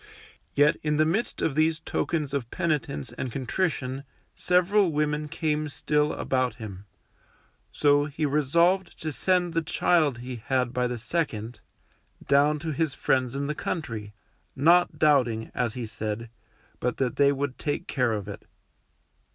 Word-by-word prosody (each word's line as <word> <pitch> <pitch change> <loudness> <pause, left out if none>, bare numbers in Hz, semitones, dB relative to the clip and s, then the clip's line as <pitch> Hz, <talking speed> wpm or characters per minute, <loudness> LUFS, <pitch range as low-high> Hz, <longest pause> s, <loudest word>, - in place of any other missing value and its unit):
Yet 145 +1 +4
in 150 -1 0
the 155 - +4
midst 195 +10 -1
of 155 - +1
these 155 +2 +2
tokens 150 -5 -2
of 130 -5 -2
penitence 150 - -2
and 130 - -3
contrition 135 0 -2 0.3
several 180 +1 +3
women 150 0 0
came 155 0 -1
still 150 +1 +1
about 130 -3 0
him, 105 -4 -8 0.9
so 145 0 +3
he 150 +1 -2
resolved 170 +6 +2
to 155 - -2
send 180 +2 +1
the 165 - +1
child 155 -3 +2
he 125 +1 -6
had 125 -1 0
by 125 -1 +1
the 125 0 -3
second 120 -3 -3 0.7
down 145 +2 +4
to 160 - -1
his 155 -1 -1
friends 130 -1 +1
in 140 +1 -2
the 150 - -1
country, 115 - -4 0.4
not 170 +6 +4
doubting, 125 -7 +2
as 120 -2 -1
he 125 -2 -4
said, 110 +1 -5 0.5
but 125 -1 -1
that 130 -2 -1
they 140 0 +5
would 140 -1 -3
take 145 - -2
care 125 -3 0
of 105 -2 -4
it. 100 - -9
145 Hz, 150 wpm, -26 LUFS, 125-155 Hz, 0.9 s, they